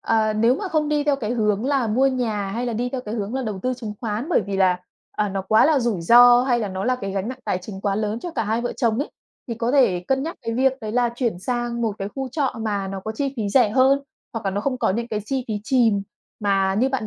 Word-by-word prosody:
Ờ, 220 -1 +1
nếu 230 +3 +3
mà 380 +8 -4
không 310 -3 0
đi 295 -1 +1
theo 290 -1 +2
cái 225 -5 -4
hướng 210 -2 0
là 275 -4 +1
mua 245 +5 +2
nhà 225 -7 -1
hay 235 +5 -3
là 240 - -2
đi 240 +3 -1
theo 255 0 -4
cái 215 -3 -6
hướng 215 +1 -3
là 265 - -1
đầu 215 -5 -4
tư 255 0 0
chứng 230 -4 -6
khoán 225 +4 -3
bởi 360 - +3
vì 200 -1 -2
là, 185 -2 +3 0.3
à, 210 0 -1
nó 195 0 -3
quá 215 +6 +4
là 310 -2 +4
rủi 235 -7 -1
ro 240 +6 +7
hay 250 -2 +2
là 215 -3 -2
nó 190 0 -4
là 255 0 +1
cái 195 -5 -5
gánh 195 +2 -2
nặng 255 - -6
tài 180 - 0
chính 190 +1 -9
quá 200 0 0
lớn 215 +1 -2
cho 350 - -5
cả 235 -8 -2
hai 220 +3 0
vợ 240 - -2
chồng 230 -4 +1
ấy, 285 - -2 0.4
thì 230 - -2
có 230 +1 -1
thể 240 -11 +4
cân 270 0 +1
nhắc 330 +3 -5
cái 230 -1 -3
việc 260 +2 +3
đấy 215 -2 -5
là 245 0 +2
chuyển 235 -8 -1
sang 240 +3 -2
một 225 -2 0
cái 195 - -3
khu 270 -1 -3
trọ 270 +1 -1
mà 205 -3 -2
nó 195 0 -5
có 220 +3 -5
chi 275 +4 -3
phí 215 -3 -1
rẻ 235 0 +4
hơn, 265 +4 +4 0.3
hoặc 225 -2 -5
là 195 - +1
nó 200 +2 -2
không 255 +3 -2
có - - +1
những 230 +4 -2
cái 215 -2 -2
chi 260 +3 -2
phí 215 - -1
chìm 225 -5 +3 0.4
mà 195 -2 +1
như 245 +6 +2
bạn 265 -5 -2
230 Hz, 290 wpm, -22 LUFS, 210-255 Hz, 0.4 s, ro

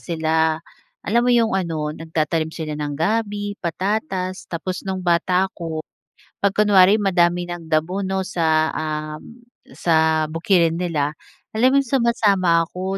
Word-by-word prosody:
sila, 160 -2 -2 0.7
alam 235 +3 +2
mo - - +4
'yong 230 -2 +3
ano, 165 -5 -2
nagtatanim 160 0 -2
sila 155 -2 -4
ng 145 -1 -3
gabi, 205 +4 -1
patatas. 185 - -2
Tapos, 180 +2 -4
no'ng 190 -1 -3
bata 180 +2 +2
ako, 160 -3 -6 0.6
'pag 200 - +4
kunwari 205 0 +5
madami 175 -3 +2
ng 170 -2 -8
damo, 170 +6 0
'no, 190 0 -2
sa, 160 -4 +1
um, 155 +8 -5 0.3
sa 160 -1 +2
bukirin 165 0 +2
nila, 155 -4 -1 0.4
alam 250 +4 +4
mo 275 - +4
'yong 275 - -2
sumasama 200 -8 +3
ako, 190 +2 -4
175 Hz, 140 wpm, -21 LUFS, 160-195 Hz, 0.7 s, kunwari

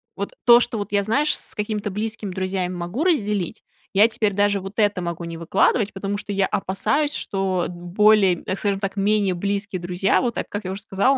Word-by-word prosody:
вот, - - -5
то, 240 -1 +9
что 240 -1 0
вот 205 -2 -5
я, 205 -1 +2
знаешь, 280 +9 +2
с - - -4
какими-то 210 -1 -3
близкими 215 0 -4
друзьями 185 -1 -2
могу 175 - -3
разделить, 210 - 0 0.3
я 205 +3 +6
теперь 215 -3 0
даже, 205 0 +2
вот, 195 +1 -8
это 205 -4 +2
могу 170 -1 -4
не 165 -1 -6
выкладывать. 195 +5 +1
Потому 195 +1 -3
что 205 - -6
я 195 -1 +2
опасаюсь, 285 +12 0
что 190 -3 -1
д 180 - -7
более, 190 +3 +4
э, - - -12
так 190 - -3
скажем 200 -2 0
так, 195 0 -4
менее 200 -1 +2
близкие 200 +1 -2
друзья, 180 +2 +1
вот 240 -3 -1
так, - - -3
как 205 -1 -5
я 185 - -3
уже 195 +2 -5
сказала, 225 +6 +2
200 Hz, 215 wpm, -22 LUFS, 185-215 Hz, 0.3 s, то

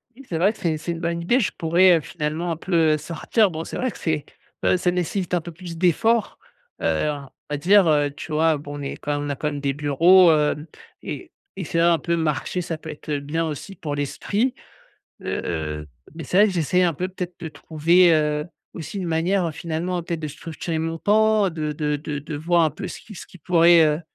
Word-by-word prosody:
Oui, 275 - -13
c'est 165 - -3
vrai 190 +5 +3
que 220 - -16
c'est 160 -3 0
c'est 170 +3 -4
une 165 - -4
bonne 170 0 -2
idée, 240 +10 +2
je 225 - 0
pourrais, 170 +2 +5
heu, - - -3
finalement 160 +2 -3
un 165 - -3
peu, 180 +2 -6 0.2
heu, - - +1
sortir. 175 +7 +1
Bon 160 0 -4
c'est - - -6
vrai 255 -2 -1
que - - -12
c'est, 155 -3 -2 0.4
heu, - - +4
ça 180 0 +1
nécessite 180 +1 -2
un 175 - +2
peu 170 - -8
plus 170 0 -9
d'effort, 205 +6 +2 0.4
heu, 80 - +1
en 140 -2 -5 0.2
va 145 - -2
dire, 185 +4 +5
heu, 145 -2 +3
tu 150 +2 -9
vois? 160 0 +3
Bon 145 0 -8
on - - -6
est 140 - -5
quand 145 0 -2
on 145 - -4
a 140 - -1
quand 150 - -3
même 145 -1 -5
des 140 -1 0
bureaux, 165 +5 +5
hem, 150 -1 +1 0.4
et - - -7 0.2
et 190 - -4
c'est 165 - -3
vrai 170 - +4
un 170 -2 +4
peu 170 -1 -1
marcher 160 +3 -1
ça 165 -1 -4
peut 160 0 -10
être, 155 0 -10
heu, 145 -1 0
bien 155 +4 -2
aussi 160 +5 -6
pour 150 -4 -4
l'esprit. 205 - -1 0.7
Heu, 75 -3 -3 0.3
mais 165 - -7
c'est 180 - -2
vrai 210 - +7
que 205 - -2
j'essaie 180 +1 +1
un 170 -2 +1
peu, 180 +5 -3
peut-être 180 -1 -6
de 160 - -5
trouver, 170 +3 +3
heu, 150 -1 +1 0.3
aussi 165 +4 -6
une 180 - -3
manière, 175 +4 +1
heu, - - -2
finalement 170 +3 -3
peut-être 170 -1 -4
de 155 - -4
structurer 160 +2 -5
mon 165 +1 -3
temps 215 0 +3
de 155 -2 -3
de 150 0 -1
de 145 0 -5
de 150 +1 -6
voir 170 +2 +2
un 155 - +3
peu 145 - -7
ce - - -8
qui 215 - -13
ce - - -9
qui 185 - -16
pourrait, 170 +1 +5
heu, 150 +1 +1
165 Hz, 240 wpm, -23 LUFS, 150-180 Hz, 0.7 s, vrai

